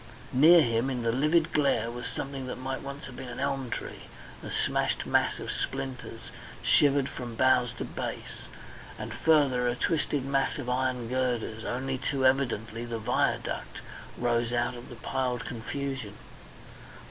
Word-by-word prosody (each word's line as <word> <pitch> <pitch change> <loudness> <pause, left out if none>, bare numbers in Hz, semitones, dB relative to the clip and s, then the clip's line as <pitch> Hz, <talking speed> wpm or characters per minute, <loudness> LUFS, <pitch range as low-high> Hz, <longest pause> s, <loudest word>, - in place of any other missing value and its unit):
Near 160 +5 +8
him 115 +1 +1
in 125 -3 -2
the 115 - +2
livid 155 +6 +2
glare 120 -6 +2
was 120 0 -5
something 135 -1 -5
that - - -4
might 130 +1 -3
once 140 +1 -7
have 130 -2 -9
been 130 - -7
an 120 - -6
elm 135 -2 -1
tree, - - -5 0.4
a - - -7
smashed - - 0
mass - - +2
of - - -4
splinters, 130 -4 -4 0.4
shivered 140 -2 +4
from 125 -4 -6
boughs 130 -1 +4
to 120 - -5
base, - - -6 0.5
and - - -5
further 140 -6 +3
a 120 - +1
twisted 145 -2 0
mass 135 0 +1
of 125 -4 -3
iron 125 -2 0
girders 120 -3 -1
only 130 +1 -2
too 135 -1 0
evidently 120 -4 +1
the 120 -1 -3
viaduct 115 +3 -1 0.4
rose 120 -1 +1
out 120 0 +1
of 120 0 -10
the 120 - -8
piled 125 +1 -2
confusion. 125 -2 -4
130 Hz, 160 wpm, -29 LUFS, 120-135 Hz, 0.5 s, Near